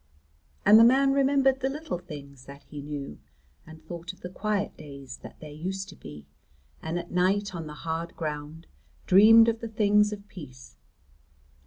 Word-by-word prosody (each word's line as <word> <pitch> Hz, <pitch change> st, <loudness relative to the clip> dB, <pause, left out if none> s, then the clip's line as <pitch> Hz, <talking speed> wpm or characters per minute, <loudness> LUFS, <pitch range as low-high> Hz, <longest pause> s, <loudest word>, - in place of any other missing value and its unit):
And 210 Hz, +2 st, +8 dB
the -, -, +8 dB
man 270 Hz, +3 st, +5 dB
remembered 270 Hz, -1 st, +3 dB
the 265 Hz, 0 st, -1 dB
little 290 Hz, -, -5 dB
things 140 Hz, -6 st, -11 dB
that 140 Hz, +1 st, -12 dB
he 145 Hz, -2 st, -9 dB
knew, 140 Hz, -, -7 dB, 0.5 s
and 160 Hz, 0 st, -14 dB
thought 170 Hz, +2 st, -7 dB
of -, -, -21 dB
the 180 Hz, -, -7 dB
quiet 205 Hz, +1 st, -2 dB
days 140 Hz, -3 st, -10 dB
that -, -, -13 dB
there 155 Hz, -1 st, -9 dB
used 190 Hz, +6 st, -5 dB
to 175 Hz, -, -12 dB
be, 75 Hz, -1 st, -11 dB, 0.6 s
and 160 Hz, +2 st, -3 dB
at 175 Hz, 0 st, -6 dB
night 190 Hz, +3 st, +1 dB
on 165 Hz, -3 st, -6 dB
the 150 Hz, -, -8 dB
hard 165 Hz, +1 st, -3 dB
ground 155 Hz, +1 st, -5 dB, 0.4 s
dreamed 225 Hz, +4 st, +7 dB
of 230 Hz, -1 st, 0 dB
the 230 Hz, -, -5 dB
things 210 Hz, -1 st, +3 dB
of 205 Hz, -1 st, -8 dB
peace. 125 Hz, -, -12 dB
180 Hz, 175 wpm, -27 LUFS, 150-215 Hz, 0.6 s, And